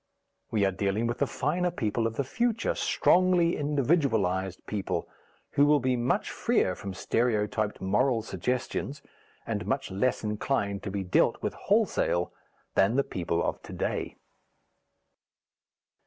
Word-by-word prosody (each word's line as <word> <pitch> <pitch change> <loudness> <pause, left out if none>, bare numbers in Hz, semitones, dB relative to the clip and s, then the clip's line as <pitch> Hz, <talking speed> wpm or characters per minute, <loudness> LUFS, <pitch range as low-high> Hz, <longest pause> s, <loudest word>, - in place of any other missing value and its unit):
We 105 -3 +2
are 95 - +2
dealing 100 +4 -1
with 120 0 -2
the - - +2
finer 175 +6 0
people 115 -8 -1
of 115 - -5
the 140 - 0
future, 230 - 0
strongly 180 -1 +3
individualized 120 - +1
people, 95 -4 -2 0.4
who 145 +1 +4
will 150 0 +5
be 130 -1 +1
much 120 0 0
freer 90 - +1
from 95 +1 -7
stereotyped 110 0 0
moral 115 +5 +2
suggestions 125 - -3 0.4
and - - -3
much - - -1
less 100 +7 0
inclined 105 -1 -1
to - - -5
be 100 0 -2
dealt 90 - +2
with - - -1
wholesale 85 0 +1 0.4
than 100 +5 +3
the 140 - +3
people 85 -5 -2
of - - -2
to - - -10
day. - - -2
115 Hz, 140 wpm, -28 LUFS, 100-140 Hz, 0.4 s, will